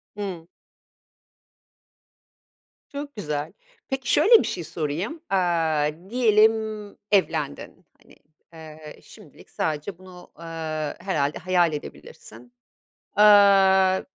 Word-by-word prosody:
Hımm. 190 Hz, -5 st, -6 dB, 2.4 s
Çok 285 Hz, 0 st, -7 dB
güzel. 150 Hz, -7 st, -4 dB, 0.4 s
Peki, 265 Hz, -3 st, -2 dB
şöyle 430 Hz, +10 st, +6 dB
bir -, -, -4 dB
şey 175 Hz, -, -4 dB
sorayım. 165 Hz, -, -4 dB
Aaa, 165 Hz, -5 st, +1 dB, 0.2 s
diyelim, 220 Hz, -2 st, +4 dB, 0.6 s
evlendin. 165 Hz, -2 st, -1 dB, 0.2 s
Hani, -, -, -21 dB, 0.4 s
eee, 155 Hz, -1 st, -12 dB
şimdilik -, -, -17 dB
sadece 155 Hz, +4 st, -4 dB
bunu, 180 Hz, -1 st, -15 dB
aaa, 160 Hz, -2 st, -5 dB
herhâlde 155 Hz, -6 st, -2 dB
hayal 175 Hz, -3 st, +1 dB
edebilirsin. 120 Hz, -, -11 dB, 0.6 s
Aaa, 195 Hz, -2 st, +5 dB
175 Hz, 90 wpm, -23 LUFS, 155-200 Hz, 2.4 s, şöyle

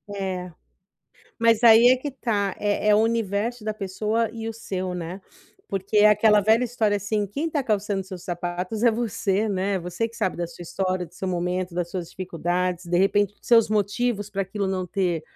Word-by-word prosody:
É. 185 Hz, -2 st, -4 dB, 0.9 s
Mas 230 Hz, 0 st, +3 dB
aí 230 Hz, +1 st, +8 dB
é 255 Hz, -, +6 dB
que 285 Hz, +3 st, -5 dB
tá, 210 Hz, -7 st, -1 dB
é 205 Hz, 0 st, 0 dB
é, 210 Hz, -, +6 dB
o -, -, +5 dB
universo 225 Hz, 0 st, 0 dB
da 215 Hz, -, -1 dB
pessoa 215 Hz, +3 st, -1 dB
e 225 Hz, -1 st, -5 dB
o -, -, -4 dB
seu, 185 Hz, -5 st, -4 dB
né. 180 Hz, +2 st, -6 dB, 0.5 s
Porque 195 Hz, +2 st, -1 dB
é 210 Hz, +1 st, +7 dB
aquela 210 Hz, 0 st, +5 dB
velha 220 Hz, +4 st, +3 dB
história 220 Hz, -4 st, 0 dB
assim, 205 Hz, +1 st, -1 dB
quem 280 Hz, -, -3 dB
está 300 Hz, -4 st, -1 dB
calçando 205 Hz, -3 st, -1 dB
seus 185 Hz, -2 st, -9 dB
sapatos 180 Hz, +5 st, -4 dB
é 240 Hz, -, +6 dB
você, 215 Hz, -2 st, -1 dB
né, 195 Hz, 0 st, 0 dB
você 180 Hz, +6 st, -3 dB
que 230 Hz, -, -15 dB
sabe 215 Hz, -7 st, -1 dB
da 175 Hz, 0 st, -2 dB
sua 170 Hz, +1 st, -11 dB
história, 185 Hz, +1 st, -2 dB
do -, -, -22 dB
seu 190 Hz, -, -4 dB
momento, 180 Hz, 0 st, -2 dB
das 175 Hz, -1 st, -2 dB
suas 175 Hz, -2 st, -5 dB
dificuldades, 180 Hz, 0 st, -2 dB
de 175 Hz, +1 st, +1 dB
repente, 205 Hz, +1 st, +2 dB
os -, -, -19 dB
seus 230 Hz, -3 st, +5 dB
motivos 210 Hz, +1 st, 0 dB
para 200 Hz, -1 st, -2 dB
aquilo 195 Hz, +1 st, -3 dB
não 190 Hz, -1 st, -1 dB
ter 175 Hz, -4 st, -1 dB
200 Hz, 200 wpm, -24 LUFS, 185-220 Hz, 0.9 s, aí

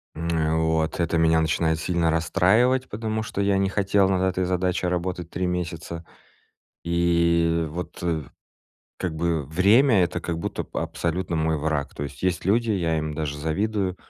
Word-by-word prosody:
М, 85 Hz, +1 st, -4 dB
э, 80 Hz, -1 st, +1 dB
вот 80 Hz, +1 st, 0 dB
это 85 Hz, 0 st, 0 dB
меня 80 Hz, 0 st, +4 dB
начинает 80 Hz, 0 st, +1 dB
сильно 85 Hz, 0 st, +1 dB
расстраивать, 100 Hz, +10 st, +2 dB
потому 110 Hz, 0 st, -3 dB
что 105 Hz, -2 st, -4 dB
я 100 Hz, -1 st, +2 dB
не 95 Hz, 0 st, +2 dB
хотел 100 Hz, 0 st, +2 dB
над 95 Hz, -1 st, +1 dB
этой 95 Hz, 0 st, +1 dB
задачей 90 Hz, 0 st, 0 dB
работать 90 Hz, -1 st, -2 dB
3 90 Hz, -, -2 dB
месяца, 85 Hz, -1 st, -4 dB, 0.8 s
и 85 Hz, -1 st, +2 dB
вот, 90 Hz, +4 st, -6 dB
э, 85 Hz, -2 st, 0 dB, 0.8 s
как 90 Hz, -3 st, -3 dB
бы 80 Hz, -1 st, 0 dB
время- 100 Hz, -, +4 dB
это 85 Hz, -, -3 dB
как 85 Hz, -2 st, -3 dB
будто 85 Hz, -, -3 dB
б -, -, -28 dB
абсолютно 85 Hz, 0 st, -2 dB
мой 80 Hz, 0 st, +1 dB
враг. 75 Hz, -1 st, -2 dB
То -, -, -5 dB
есть 70 Hz, 0 st, -7 dB
есть 90 Hz, -1 st, 0 dB
люди- 115 Hz, +4 st, +2 dB
я 85 Hz, -5 st, 0 dB
им 75 Hz, -1 st, -3 dB
даже 75 Hz, -2 st, -3 dB
завидую- 95 Hz, +4 st, -1 dB
85 Hz, 170 wpm, -24 LUFS, 80-95 Hz, 0.8 s, меня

